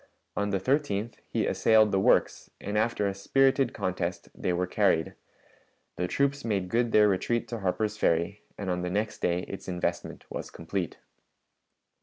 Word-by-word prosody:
On 100 0 0
the 100 -1 0
13th 120 -2 0
he - - 0
assailed 110 -2 +4
the 95 - +2
works, 95 - +2
and 105 +1 -4
after 110 -1 +1
a 100 - -1
spirited 135 +5 +2
contest 90 -1 -3
they - - -2
were 90 +1 0
carried; 90 -3 +1 0.8
the 90 - -1
troops 140 +6 0
made 100 -5 -1
good 120 +2 +1
their 105 -1 +6
retreat 115 +5 0
to 115 -1 -4
Harper's 105 +3 -1
Ferry, 85 +1 +1 0.2
and 95 -2 -3
on 90 0 -1
the 90 - -2
next 105 +4 -2
day 90 0 +1
its 95 - -8
investment 90 -1 -3
was - - -6
complete. 85 +1 -4
100 Hz, 165 wpm, -28 LUFS, 90-115 Hz, 0.8 s, their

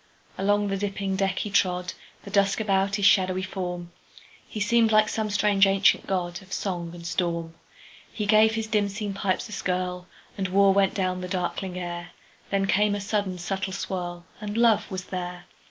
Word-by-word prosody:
Along 205 +1 +1
the 195 - -1
dipping 195 -1 -2
deck 195 -1 0
he 210 - -2
trod, 180 -2 +1 0.3
The 200 - -9
dusk 200 0 +2
about 200 -2 +1
his 205 -1 0
shadowy 185 -2 +4
form; 180 -2 -5 0.6
He 215 - -6
seemed 225 +2 +3
like 215 0 +5
some 220 -1 -2
strange 205 -1 +4
ancient 195 +1 +3
godOf 185 0 -3
song 175 -4 -3
and 170 -1 -10
storm. 170 -1 -2 0.6
He 210 - -3
gave 215 +1 +5
his 225 0 -1
dim 210 -2 +1
seen 205 0 -4
pipes 195 +1 -1
a - - -12
skirlAnd 180 0 -4
war 195 +1 +5
went 195 -1 +2
down 185 -2 -1
the 180 - -4
darkling 180 0 -3
air; 175 -1 -5 0.4
Then 195 -1 +1
came 205 +1 +2
a - - -3
sudden 200 -2 -1
subtle 190 +2 -3
swirl, 175 -2 -4 0.2
And 210 +1 -4
love 230 -3 +3
was 185 -2 -4
there. 180 -1 -5
195 Hz, 175 wpm, -26 LUFS, 180-205 Hz, 0.6 s, like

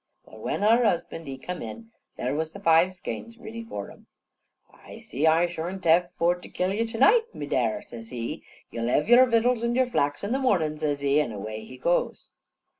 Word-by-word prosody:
Well, - - -14
when - - -3
har 230 +3 +5
husban' 165 -6 -1
he 135 -1 -5
come 180 +7 -6
in, 230 -1 -8 0.3
there 125 +2 -2
was 160 +2 -2
the 200 - -9
five 170 -1 +4
skeins 230 +5 -7
riddy 230 0 -8
for 100 - -6
him. - - -18 0.7
"I - - -13
see 145 +5 -1
I 165 +2 +5
shorn't 175 +2 -5
hev 170 +2 +4
for 170 +1 +3
to 180 - -11
kill 185 +1 -1
you 230 +3 0
to 225 0 -6
night, 450 - +4
me 145 - -5
dare," 125 -6 0
says 115 -1 -10
he. 120 -2 -5 0.3
"You'll 115 0 -3
hev 145 +7 +1
yar 245 +2 +7
vittles 235 0 +2
and 235 0 0
yar 260 0 +4
flax 145 -12 -1
in 200 - -2
the 265 - +1
mornin'," 165 - +1
says 145 -2 -1
he, 140 +1 +3
an' 140 - -3
away 110 +1 -6
he 130 - -11
goes. 170 +7 -1
175 Hz, 215 wpm, -26 LUFS, 140-230 Hz, 0.7 s, yar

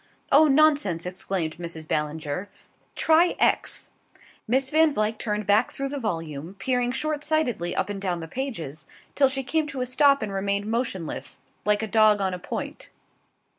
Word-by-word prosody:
"Oh, 310 +2 +7
nonsense!" 280 - +3
exclaimed 180 -3 -3
Mrs. 165 -2 -6
Ballinger. 150 +4 -2 0.5
"Try 325 +2 +4
X." - - +1 0.6
Miss 260 +4 +1
Van 315 0 +5
Vluyck 215 -4 -1
turned 210 -2 -2
back 205 +2 +3
through 275 0 -4
the 285 0 -4
volume, 165 - -4
peering 245 +2 0
short 295 +3 -2
sightedly 295 - 0
up - - 0
and 205 -1 -5
down 180 -3 -1
the 165 - -6
pages, 165 - -5 0.3
till 275 -2 +4
she 270 0 -3
came 310 +4 0
to 275 -3 -5
a - - 0
stop 280 +1 +4
and 205 -2 -4
remained 200 +1 -1
motionless, 190 - -3 0.3
like 210 +1 +2
a - - -2
dog 215 0 +4
on 190 -2 0
a 180 - -4
point. - - -6
215 Hz, 170 wpm, -25 LUFS, 180-275 Hz, 0.6 s, Oh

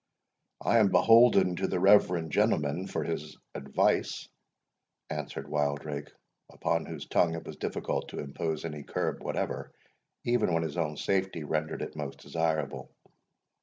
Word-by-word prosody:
"I 115 - +4
am 105 - +5
beholden 95 -2 +6
to 95 - 0
the 90 - -1
reverend 90 -4 +4
gentleman 75 +8 +1
for - - -2
his - - -4 0.2
advice," 70 -1 0 0.8
answered 70 - -5
Wildrake, 75 0 -2 0.4
upon 85 -1 -1
whose 80 -4 -6
tongue 85 -1 +2
it 85 - -7
was - - -8
difficult - - -3
to - - -8
impose 80 +3 -3
any 75 -2 -5
curb - - -2
whatever, - - -3 0.5
even 120 -5 +2
when 80 - +1
his 80 -1 -4
own 75 -4 -1
safety 95 -4 -1
rendered 75 +1 -2
it - - -7
most 75 -3 -5
desirable. 80 -3 -2
80 Hz, 140 wpm, -29 LUFS, 75-90 Hz, 0.8 s, beholden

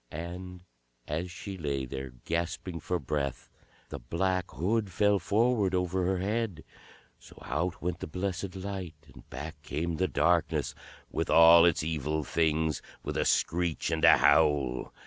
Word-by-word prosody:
And 90 +3 -7 0.4
as 80 +5 -3
she 95 +2 -8
lay 70 -4 -2
there, 65 +1 -6 0.2
gasping 85 +1 -3
for 90 +3 -2
breath, 70 -5 -3 0.4
the - - -6
black 90 +9 -1
hood 100 +6 -1
fell 105 +3 +3
forward 105 0 +2
over 90 0 0
her 95 0 +1
head. 100 -3 -2 0.6
So - - -16
out 85 +7 -2
went 90 -1 -2
the - - -5
blessed 90 +2 -4
light 95 -3 -5 0.2
and - - -16
back 75 +2 -7
came 80 +3 -3
the 95 - +1
darkness, 80 +3 +1 0.4
with - - -2
all 85 +2 +8
its 85 -3 +2
Evil 75 -1 -2
Things, 80 +1 0 0.2
with - - -4
a - - +1
screech 85 -1 0
and 80 0 -1
a - - +8
howl. 75 -3 +3
85 Hz, 150 wpm, -29 LUFS, 75-95 Hz, 0.6 s, all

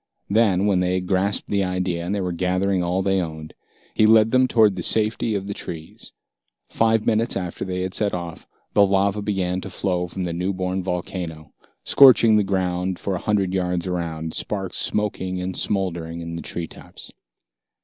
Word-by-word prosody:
Then, 100 -3 +3
when 100 -3 +3
they 90 0 +1
had 90 0 -2
grasped 95 +2 0
the 100 -1 +2
idea 90 -2 -2
and 100 +4 -2
were 90 -2 -2
gathering 90 +2 0
all 90 +2 0
they 95 -1 +2
owned, 80 -2 -7 0.4
he 110 - +4
led 110 0 +5
them 130 0 +4
toward 110 -5 +4
the 90 - -4
safety 110 +3 +2
of 100 -1 -3
the 100 - -4
trees. 80 -4 -7 0.6
Five 110 -1 +1
minutes 115 0 +1
after 90 -3 -4
they 90 -1 -3
had 95 0 -3
set 105 -2 0
off, 85 -2 -6 0.3
the 100 - +6
lava 100 +1 +2
began 95 -3 -1
to 95 - -7
flow 90 -1 -1
from 95 +2 -5
the 85 -1 -2
new 90 +3 -1
born 95 0 -2
volcano, 90 -3 -5 0.3
scorching 120 -5 +7
the 105 - +4
ground 95 -1 -1
for 100 - -3
a 90 - -2
hundred 100 -3 0
yards 90 -1 -1
around, 80 -3 -3
sparks 95 -3 -3
smoking 95 -3 -1
and 90 0 -4
smoldering 85 -4 -2
in 85 0 -6
the 85 - -5
treetops. 85 -2 -7
95 Hz, 180 wpm, -23 LUFS, 90-100 Hz, 0.6 s, scorching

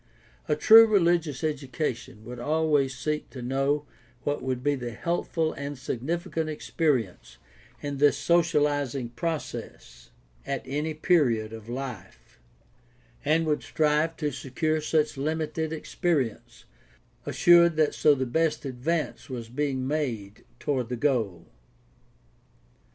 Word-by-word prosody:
A 150 - +2
true 225 +8 +8
religious 170 - +2
educa 145 -2 -1
tion 110 -2 -14
would 125 +1 -8
always 145 -1 +1
seek 150 +3 -2
to 130 -3 -8
know 135 +3 0 0.4
what 145 0 -1
would 130 -1 -3
be 145 +1 +2
the 120 -4 -4
healthful 165 +1 -1
and 140 0 -6
significant 160 +6 -3
experience 145 - -1 0.5
in 145 -1 -3
this 145 0 +4
socializing 145 -7 +1
process 160 +5 -6 0.3
at 135 - -3
any 150 +4 -2
period 125 - +2
of 110 0 -9
life, 130 -1 -8 0.8
and 165 +1 +2
would 150 -1 0
strive 155 +1 +1
to 150 -2 -1
secure 140 +4 -1
such 155 -1 +1
limited 155 +2 -2
experi 160 - 0
ence, - - -20 0.6
assured 170 -1 +5
that 155 -1 +2
so 150 -1 +4
the 130 -1 -1
best 155 +3 0
advance 145 +7 -2
was 120 -3 -6
being 130 0 -2
made 120 -9 -3
toward 130 -5 -1
the 125 - -2
goal. 115 - 0
145 Hz, 125 wpm, -27 LUFS, 130-160 Hz, 0.8 s, true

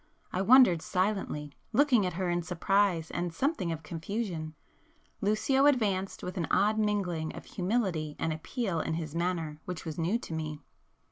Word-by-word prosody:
I 185 - 0
wondered 220 -6 +7
silently, 185 -7 -1 0.2
looking 255 -8 +4
at 180 - -3
her 185 +1 -2
in 175 0 +1
surprise 180 -1 +1
and 175 0 -2
something 195 - -1
of 160 0 -5
confusion,—Lucio 210 - -2
advanced 200 -8 +1
with 180 +2 -5
an 170 - -1
odd 215 +2 +3
mingling 185 -7 -1
of - - -9
humility 180 -7 -1
and 160 - -1
appeal 180 - -2
in 160 - -1
his 160 -3 -4
manner 165 -3 -2
which 180 -2 -5
was 160 0 -5
new 175 +8 +1
to 200 - -8
me. 155 -2 -4
180 Hz, 155 wpm, -30 LUFS, 160-210 Hz, 0.2 s, wondered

